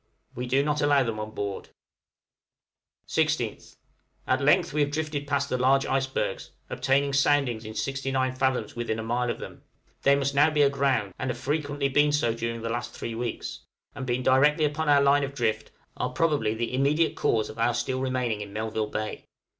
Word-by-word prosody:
We 125 +1 -5
do 135 +3 +2
not 150 0 0
allow 145 -2 +4
them 115 -3 -3
on 110 0 -4
board. 100 -1 -4 1.4
16th. - - -1 0.5
At 130 +2 +1
length 145 +2 +3
we 150 - +1
have 145 - +2
drifted 150 -1 -3
past 140 0 0
the 125 - -2
large 135 +2 +3
icebergs, 135 0 -1 0.2
obtaining 135 +2 +1
soundings 135 -5 +2
in 110 0 -7
69 135 -1 -1
fathoms 130 -1 -1
within 120 -2 -2
a 110 - -4
mile 120 +2 -1
of - - -2
them; - - -9 0.4
they 140 0 +5
must 140 0 0
now 145 +3 +5
be 150 -2 +3
aground, 135 -8 +1
and 130 - -2
have 125 - -2
frequently 145 +1 -1
been 145 +2 +3
so 135 -6 +1
during 115 0 -4
the - - -2
last 120 +1 -4
three 115 - -5
weeks; 115 0 -4 0.3
and 130 - -6
being 125 +1 -1
directly 150 +5 +4
upon 150 +1 -1
our 140 -1 +5
line 140 +1 +4
of 140 0 -4
drift, 110 -6 -1 0.3
are - - -2
probably 145 -10 +1
the 115 +2 -3
immediate 145 +5 +2
cause 110 -2 +1
of - - -10
our 115 +1 +2
still 130 +2 -1
remaining 125 -5 -1
in 100 -1 -7
Melville 110 +1 -2
Bay. 110 0 -4
135 Hz, 190 wpm, -26 LUFS, 120-145 Hz, 1.4 s, they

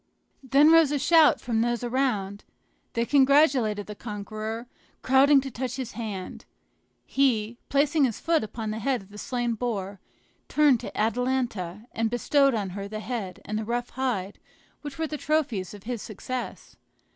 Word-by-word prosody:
Then 280 +3 +5
rose 325 -3 +6
a 295 - +1
shout 320 +2 +5
from 230 -2 -1
those 240 0 0
around; 235 -6 -1 0.5
they 235 0 0
congratulated 265 -6 +3
the 210 - -7
conqueror, 215 +2 -6 0.4
crowding 270 +2 +5
to 270 0 -6
touch 250 +1 -4
his 260 -3 -5
hand. 210 -5 -6 0.6
He, 235 -4 +1
placing 285 +1 +3
his 235 -5 -3
foot 330 -4 +1
upon 220 0 -5
the 220 - -4
head 255 -1 -1
of 190 - -20
the 210 0 -11
slain 240 -1 -2
boar, 205 -4 -3 0.5
turned 295 -5 +4
to - - -8
Atalanta 225 -4 -1
and 225 0 -1
bestowed 275 +2 +2
on 200 -4 -2
her 200 +1 -5
the 215 +1 -6
head 215 -5 -5
and 215 +1 -2
the - - -3
rough 240 +2 -3
hide 230 -7 -3 0.4
which 290 0 -8
were 320 - -1
the 305 -1 -4
trophies 280 - -1
of 200 - -13
his 235 -2 -4
success. 245 +4 -6
240 Hz, 165 wpm, -26 LUFS, 215-270 Hz, 0.6 s, rose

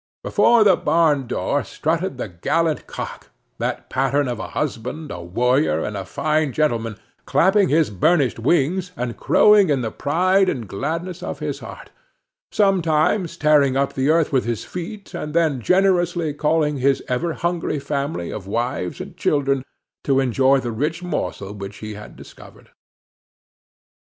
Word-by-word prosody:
Before 235 -2 +4
the 195 -3 +5
barn 150 -5 +2
door 140 +3 -1
strutted 165 -1 -2
the 125 - -4
gallant 155 - -1
cock, - - -7 0.3
that - - -3
pattern 135 +2 0
of 120 -2 -3
a - - -5
husband, 150 +2 -3
a 90 - -6
warrior 85 -4 +1
and 105 - -4
a 95 -1 -4
fine 155 +4 0
gentleman, 115 -8 0 0.3
clapping 190 +1 +3
his 155 -4 +2
burnished 135 - +2
wings 170 +8 +1
and 120 -1 -3
crowing 210 -4 +5
in 140 -3 +1
the 110 -2 -3
pride 185 +6 +2
and 120 -6 -4
gladness 165 - -4
of - - -5
his - - -4
heart, - - -11 0.6
sometimes 175 -2 +1
tearing 145 -4 +3
up 140 0 0
the 135 +2 0
earth 160 -1 +3
with 130 -3 +2
his 115 -3 -3
feet, 195 +3 -7
and 150 +1 -5
then 155 -6 +2
generously 175 - +2
calling 150 -1 +1
his 135 +1 +2
ever 160 +7 -1
hungry 170 -2 -2
family 140 - -3
of 95 -3 -7
wives 115 -4 -2
and - - -9
children 140 -2 +1 0.4
to 135 -1 +2
enjoy 135 +1 +3
the 120 -2 -4
rich 155 +9 -2
morsel 100 - -4
which 100 -1 -8
he 110 0 -7
had 105 0 -11
discovered. - - -15
145 Hz, 155 wpm, -21 LUFS, 125-170 Hz, 0.6 s, the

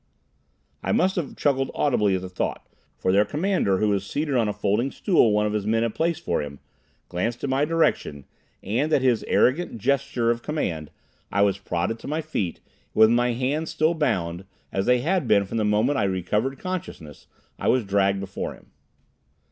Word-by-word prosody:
I - - -2
must 190 +1 +2
have 170 -6 -3
chuckled 135 -2 +1
audibly 105 -9 +2
at 95 - -2
the 95 - -6
thought, 90 - -3 0.3
for 95 - 0
their 100 +2 +5
commander 150 - 0
who 105 +2 +1
was 100 -1 +1
seated 145 +8 -2
on 115 -3 +2
a - - -1
folding 105 +5 0
stool 160 - +3
one 105 0 +2
of 105 - -1
his 105 -1 -2
men 115 +1 +2
had 115 -2 -1
placed 170 0 -1
for - - 0
him, 70 -1 -7 0.5
glanced 115 +7 -3
in 140 - -1
my 135 +2 +2
direction, 150 - 0 0.4
and, 125 +10 0
at 140 - +3
his 125 -4 +2
arrogant 145 0 +2
gesture 130 0 +1
of 120 0 -2
command, 85 - -3 0.4
I 100 - +3
was 100 -1 +1
prodded 95 +4 -2
to - - -9
my 155 +3 -1
feet, 105 - -3
and - - -35 0.3
with 110 +1 +6
my 120 +1 +2
hands 135 +6 -1
still 160 +1 +1
bound, 90 - -1 0.3
as 95 0 -1
they 125 -1 +4
had 170 -1 0
been 100 -2 +4
from 105 - -4
the 110 - +1
moment 110 +7 +2
I 100 - +2
recovered 105 +8 -1
consciousness, 180 - -6 0.3
I - - -2
was 125 -4 +3
dragged 100 0 +2
before 95 -1 -5
him. - - -22
115 Hz, 195 wpm, -24 LUFS, 100-145 Hz, 0.5 s, with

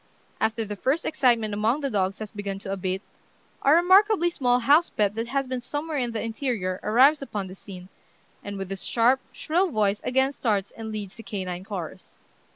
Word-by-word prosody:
After 220 0 0
the 205 0 -5
first 270 - 0
excitement 235 -7 +2
among 220 +8 +1
the 275 -2 -2
dogs 195 -1 0
has 215 -1 -7
begun 205 -2 -4
to 195 - -4
abate, 190 0 -2 0.6
a 275 - +4
remarkably 370 +2 +5
small 250 -5 +2
house 300 +7 +5
pet 205 -1 0
that 225 +2 -3
has 275 +2 -1
been 255 -1 -4
somewhere 295 +4 -3
in 245 -2 -1
the 225 - -3
interior 225 -6 -2
arrives 265 +8 +5
upon 210 -7 -4
the 185 - -9
scene, 185 -2 -11 0.6
and 200 0 -6
with 195 0 -6
his 195 - -4
sharp, 245 +3 +3
shrill 355 +4 0
voice 210 -5 +1
again 265 +2 +2
starts 210 -8 -1
and 220 -1 -7
leads 210 -2 -6
the - - -8
canine 185 -4 -5
chorus. 190 -6 -7
225 Hz, 190 wpm, -25 LUFS, 200-270 Hz, 0.6 s, remarkably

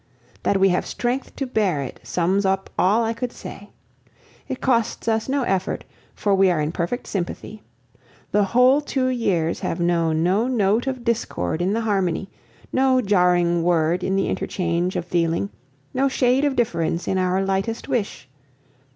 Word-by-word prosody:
That 195 - +1
we 195 0 +5
have 180 - 0
strength 250 +2 -3
to 275 - -2
bear 200 - 0
it 130 - -8
sums 185 +3 0
up 195 0 0
all 210 +5 +3
I 225 0 0
could 235 +1 -4
say. - - -10 0.8
It 260 - -4
costs 235 -3 0
us 220 +2 0
no 275 0 +1
effort, 190 -5 -1 0.3
for 205 - +1
we 195 -1 +4
are 175 -3 +1
in 150 +1 -1
perfect 175 +7 -3
sympathy. 200 +3 -5 0.7
The 205 -1 +3
whole 250 +7 +4
two 265 -3 -1
years 185 -10 0
have 165 - -3
known 165 -2 +1
no 195 +7 +2
note 225 0 +1
of 260 -2 -3
discord 175 - -1
in 185 +3 +1
the 230 - 0
harmony, 195 -3 -1 0.4
no 260 0 +3
jarring 180 -5 +3
word 170 +1 +1
in 190 - 0
the 195 - +1
interchange 175 0 -1
of 170 - -2
feeling, 170 +2 0 0.4
no 270 +2 +2
shade 260 +1 +2
of 285 -2 +1
difference 175 -9 -1
in 190 - +1
our 185 +1 +1
lightest 195 +4 -2
wish. 210 - -2
195 Hz, 170 wpm, -22 LUFS, 175-240 Hz, 0.8 s, we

